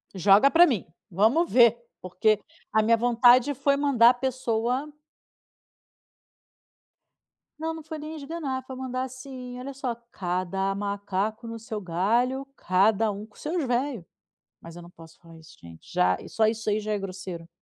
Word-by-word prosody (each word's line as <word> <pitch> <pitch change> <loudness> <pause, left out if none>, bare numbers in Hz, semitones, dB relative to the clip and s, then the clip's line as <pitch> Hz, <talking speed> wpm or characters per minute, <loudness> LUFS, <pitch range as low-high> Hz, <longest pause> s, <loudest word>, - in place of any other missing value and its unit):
Joga 195 +6 +5
ara 335 +5 +6
mim. 240 - -1 0.2
Vamos 220 - +2
ver, 235 -2 +6 0.2
porque 200 +4 +1 0.3
a 220 - +4
minha 230 +1 +3
vontade 245 +3 +4
foi 280 +1 +1
mandar 270 -5 +5
a - - -2
pessoa 255 +2 -2 2.7
Não, 320 +1 -2
não 320 -1 -9
foi 315 +1 -7
nem 305 +2 -7
esganar, 280 -3 -5
foi 260 - -8
mandar, 255 0 -3
assim: 260 -1 -8
"Olha 275 +2 -7
só, 265 -2 -3 0.2
cada 185 +2 -2
macaco 200 +2 -3
no 230 0 -6
seu 215 -1 -6
galho, 230 +10 0
cada 210 +3 +2
um 205 +1 -7
com 215 - -24
seus 320 0 -3
velho". 245 - -2 0.6
Mas 165 0 -12
eu 175 - -9
não 170 - -13
posso 165 -2 -16
falar 165 -1 -16
isso 160 0 -17
gente. 85 -1 -14
Já 90 +1 +2
só 220 - +2
isso 220 0 -1
aí 210 - +1
já 215 0 -3
é 210 - 0
grosseiro. 185 -3 -7
230 Hz, 160 wpm, -26 LUFS, 195-260 Hz, 2.7 s, ara